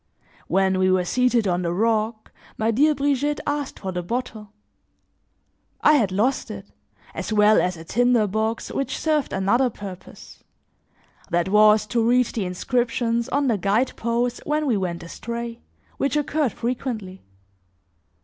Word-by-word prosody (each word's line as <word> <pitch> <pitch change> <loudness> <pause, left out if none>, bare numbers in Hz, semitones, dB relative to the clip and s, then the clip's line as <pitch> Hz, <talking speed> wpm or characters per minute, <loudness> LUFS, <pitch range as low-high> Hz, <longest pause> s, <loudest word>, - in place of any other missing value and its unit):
When 190 +1 +2
we 185 0 +3
were 185 -1 +2
seated 245 0 +2
on 180 -1 0
the 170 -1 -1
rock, 220 +3 -1 0.3
my 220 +1 +1
dear 295 +7 +3
Brigitte 285 +1 0
asked 290 -1 -3
for 190 - -5
the 180 -1 -3
bottle; 215 +1 -5 1.3
I 300 - +6
had 225 -10 +2
lost 220 +8 0
it, - - -9 0.4
as - - -5
well 210 0 +5
as 180 -1 -1
a 160 - -9
tinder 245 +4 +2
box 220 +3 -2
which 275 - -2
served 305 -3 0
another 220 +7 +2
purpose: 195 -4 -11 0.9
that 175 +1 0
was 210 +1 +5
to 230 +2 0
read 245 +2 +4
the 215 -5 -2
inscriptions 235 +4 -1
on 285 +1 +1
the 230 -6 +1
guide 210 +7 +1
posts 235 +1 -1
when 300 +1 -1
we 250 -6 +2
went 175 -3 -3
astray, 235 +6 -6 0.4
which 280 +2 0
occurred 295 -4 0
frequently. 230 -6 -4
230 Hz, 150 wpm, -23 LUFS, 195-250 Hz, 1.3 s, I